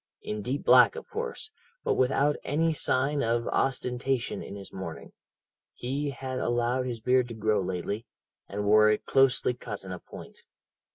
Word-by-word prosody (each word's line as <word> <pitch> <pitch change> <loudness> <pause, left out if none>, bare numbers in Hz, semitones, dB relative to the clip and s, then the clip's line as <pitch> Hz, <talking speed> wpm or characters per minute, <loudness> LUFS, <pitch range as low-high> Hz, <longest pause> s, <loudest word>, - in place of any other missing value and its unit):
In 105 0 -4
deep 130 +6 -3
black, - - +7
of 465 - -8
course, 455 -6 -5 0.3
but - - +2
without 135 +3 +2
any 160 +3 +1
sign 140 0 +1
of 115 0 0
ostentation 125 -1 -1
in - - -8
his 100 -1 -10
mourning. 85 -4 -7 0.6
He 140 +4 -2
had 130 -1 -5
allowed 120 +2 0
his 120 -2 -4
beard 125 +2 +2
to 115 - -7
grow 110 -1 +1
lately, 95 +4 -3 0.4
and 105 +1 -3
wore 105 +1 +6
it 105 - 0
closely 135 -2 +3
cut 105 -5 -7
in 95 - -8
a 90 - -5
point. - - -12
125 Hz, 165 wpm, -28 LUFS, 105-135 Hz, 0.6 s, black